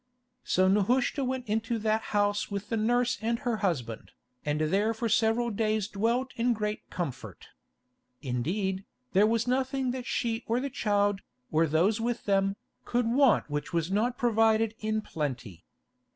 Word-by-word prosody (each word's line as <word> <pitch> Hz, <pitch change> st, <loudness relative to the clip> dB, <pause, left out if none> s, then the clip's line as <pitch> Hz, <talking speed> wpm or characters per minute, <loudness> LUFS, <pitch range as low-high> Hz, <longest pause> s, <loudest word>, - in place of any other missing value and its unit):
So 185 Hz, +1 st, +2 dB
Nehushta 240 Hz, +8 st, +2 dB
went 255 Hz, -1 st, -3 dB
into 225 Hz, +2 st, -1 dB
that 220 Hz, 0 st, +1 dB
house 205 Hz, 0 st, +1 dB
with 200 Hz, +1 st, -5 dB
the 230 Hz, -, 0 dB
nurse 240 Hz, +2 st, +1 dB
and 230 Hz, +1 st, 0 dB
her 235 Hz, -1 st, -2 dB
husband, 135 Hz, -, -3 dB, 0.3 s
and 150 Hz, 0 st, -1 dB
there 200 Hz, +8 st, +1 dB
for 230 Hz, +1 st, -1 dB
several 230 Hz, +2 st, +2 dB
days 215 Hz, -1 st, 0 dB
dwelt 235 Hz, +5 st, 0 dB
in 240 Hz, +1 st, +2 dB
great 210 Hz, -1 st, -4 dB
comfort. 165 Hz, -8 st, -6 dB, 0.7 s
Indeed, 185 Hz, -, -2 dB, 0.3 s
there 200 Hz, +3 st, +5 dB
was 230 Hz, 0 st, +1 dB
nothing 260 Hz, +1 st, 0 dB
that 255 Hz, 0 st, -5 dB
she 230 Hz, -2 st, -1 dB
or 230 Hz, +2 st, +1 dB
the 275 Hz, +1 st, -3 dB
child, 205 Hz, -5 st, +1 dB, 0.3 s
or 160 Hz, +1 st, +3 dB
those 180 Hz, +9 st, +2 dB
with 240 Hz, +1 st, -2 dB
them, 195 Hz, -1 st, +2 dB, 0.3 s
could 245 Hz, 0 st, 0 dB
want 270 Hz, -1 st, +4 dB
which 145 Hz, +1 st, -4 dB
was 170 Hz, +1 st, 0 dB
not 235 Hz, +5 st, +1 dB
provided 225 Hz, -2 st, +3 dB
in 215 Hz, 0 st, -1 dB
plenty. 125 Hz, -, -5 dB
215 Hz, 155 wpm, -29 LUFS, 195-235 Hz, 0.7 s, there